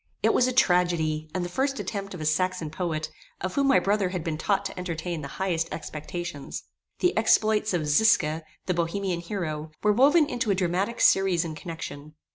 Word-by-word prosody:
It - - +4
was 250 - +4
a - - +1
tragedy, 175 -8 +2
and 180 +1 -2
the 175 - -8
first 270 +1 0
attempt 195 -3 -4
of 170 - -8
a - - -3
Saxon 165 0 0
poet, 155 -2 -3 0.3
of 185 0 -3
whom 275 -1 +2
my 270 - +6
brother 200 -1 +1
had 180 -3 -4
been 165 -2 -2
taught 200 +5 0
to 195 - -5
entertain 170 -2 -4
the 140 - -5
highest 170 -4 -1
expectations. 155 -1 -6 0.4
The 360 - +2
exploits 215 -1 +3
of 170 -4 0
Zisca, 155 -1 +3 0.2
the 180 - 0
Bohemian 175 +1 -1
hero, 165 -4 -4
were 210 0 +4
woven 290 +7 +5
into 245 -6 -2
a 200 - +3
dramatic 185 +5 -1
series 185 -3 +4
and 160 -2 -5
connection. 155 -3 -8
180 Hz, 190 wpm, -26 LUFS, 160-200 Hz, 0.4 s, my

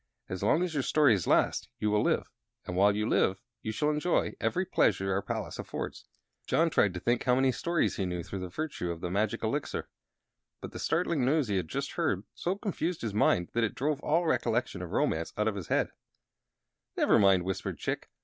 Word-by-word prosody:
As 95 -1 -4
long 155 - +3
as 180 -3 -2
your 145 - +1
stories 130 - +3
last - - +2
you 105 - 0
will 105 0 +3
live; - - +1 0.4
and 90 - -4
while 100 +2 +4
you 105 +1 0
live 95 -4 +2 0.2
you 110 - -3
shall 150 +7 +1
enjoy 150 +4 +1
every 185 +1 0
pleasure 95 - +2
our 100 - +1
palace - - -4
affords." - - -5 0.4
John 165 0 +2
tried 100 -9 +3
to - - -3
think 120 +5 +1
how 125 -1 +4
many 130 0 +3
stories 170 +6 0
he 95 - -1
knew 90 -1 -3
through 100 - -6
the 90 -1 -5
virtue 140 - -4
of 85 -1 -4
the 90 - -3
magic 100 +2 0
Elixir; - - -2 0.7
but - - -8
the - - -7
startling 165 -4 +1
news 140 -1 +2
he 100 - +1
had 90 - -2
just 140 +6 -3
heard 145 - 0
so 180 +2 -2
confused 180 - -3
his 110 -3 -2
mind 90 -4 +2
that 120 - +1
it 115 - -1
drove 145 +1 0
all 165 +3 +1
recollection 120 - 0
of 90 - -6
romance 80 0 0
out 105 +1 +1
of 110 - +1
his 95 -5 -6
head. - - +1 1.1
"Never - - +4
mind," 95 -3 +5
whispered 95 0 -3
Chick. - - -3
110 Hz, 210 wpm, -30 LUFS, 95-150 Hz, 1.1 s, mind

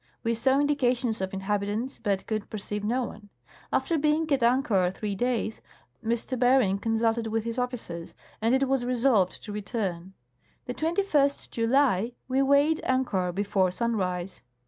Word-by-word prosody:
We 230 - +1
saw 265 +4 +2
indications 250 -6 +1
of 190 0 -2
inhabitants, 205 +5 -2
but 200 -2 -1
could 215 -2 -3
perceive 210 0 -4
no 245 +5 0
one. 210 -3 -9 0.4
After 330 -2 +1
being 305 +2 +2
at 270 - +1
anchor 235 -7 +3
three 205 +2 -4
days, 225 0 -1 0.4
M. 230 +1 +1 0.2
Bering 245 -6 +4
con 225 +2 -1
sulted 225 0 +1
with 225 0 -1
his 230 +2 -3
officers, 225 -10 -4 0.3
and 230 +3 +3
it 270 0 +2
was 265 -1 +1
resolved 245 -6 +2
to 210 - -7
return. 195 -4 -4 0.5
The 245 - -4
21st 315 -3 +1
July 235 -2 +2
we 260 +1 +1
weighed 280 +3 +3
anchor 225 -9 0
before 195 0 +1
sunrise. 185 -4 -2
230 Hz, 150 wpm, -27 LUFS, 200-260 Hz, 0.5 s, Bering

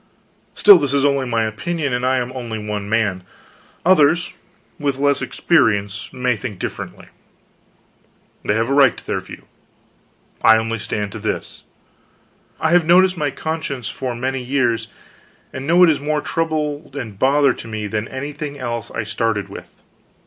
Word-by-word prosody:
Still, 200 -3 +8
this 140 -2 -1
is 140 0 +2
only 140 -2 +1
my 115 -2 +1
opinion, 140 +6 -2
and 125 0 -1
I 130 +1 +2
am 125 0 -2
only 120 -4 -5
one 105 -1 -4
man; 105 -4 +1 0.6
others, 175 0 +4 0.5
with 140 -3 -1
less 140 0 +2
experience, 105 - +1
may 125 -1 0
think 110 -3 -6
differently. - - -7 1.3
They 105 - +1
have 115 +1 +1
a 135 - 0
right 140 -2 +5
to - - -13
their - - -1
view. - - -11 1.0
I 110 0 +7
only 115 0 -2
stand 105 0 -3
to - - -7
this: - - -4 1.0
I 160 - +1
have 175 0 +5
noticed 180 +3 +5
my 150 -4 -1
conscience 140 -5 -4
for 130 -2 -4
many 130 +2 -2
years, 125 -3 0 0.7
and 130 +1 -5
I - - -7
know 175 +2 +6
it 175 - +7
is 150 - -1
more 150 +1 -1
trouble 155 -3 -2
and 110 -7 -6
bother 140 0 +4
to 115 - -10
me 110 -1 -4
than 105 +2 -3
anything 145 +2 -6
else 120 -4 -4
I - - -3
started 110 -1 -2
with. - - -11
130 Hz, 165 wpm, -20 LUFS, 115-145 Hz, 1.3 s, Still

